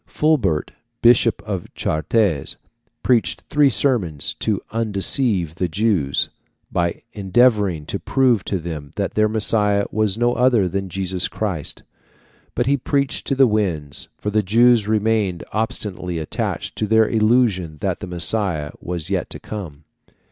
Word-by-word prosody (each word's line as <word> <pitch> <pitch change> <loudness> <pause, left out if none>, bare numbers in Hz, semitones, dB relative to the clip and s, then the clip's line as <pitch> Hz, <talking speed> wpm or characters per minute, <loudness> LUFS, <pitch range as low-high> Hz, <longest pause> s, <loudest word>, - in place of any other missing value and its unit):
Fulbert, 120 - +1 0.3
Bishop 120 -1 +4
of 95 -5 -5
Chartres, 80 0 0 0.5
preached 90 -9 +1
three 145 -2 +5
sermons 105 - 0
to 105 -3 0
undeceive 105 - +2
the 90 +2 -2
Jews, 85 -6 0 0.4
by 85 -1 -1
endeavouring 100 -5 +2
to 100 - -4
prove 125 +1 +2
to 100 - -1
them 80 -4 -6
that - - -2
their 110 0 +2
Messiah 105 -2 +2
was 110 -1 0
no 120 +1 +2
other 120 -5 +3
than 95 +1 -3
Jesus 95 0 -2
Christ; 95 -9 -3 0.7
but 120 - +1
he 140 +2 +2
preached 140 +1 -1
to 135 - +1
the 135 0 +6
winds, 85 - -2
for 105 - -3
the 110 +1 +2
Jews 115 +2 +4
remained 110 -4 0
obstinately 105 -5 -3
attached 80 -2 -3
to 110 - -1
their 110 +1 +4
illusion 110 -8 +1
that - - -1
the - - -7
Messiah 90 -3 0
was 90 0 -5
yet 95 -2 -1
to - - -7
come. 85 -9 -8
105 Hz, 140 wpm, -21 LUFS, 85-115 Hz, 0.7 s, the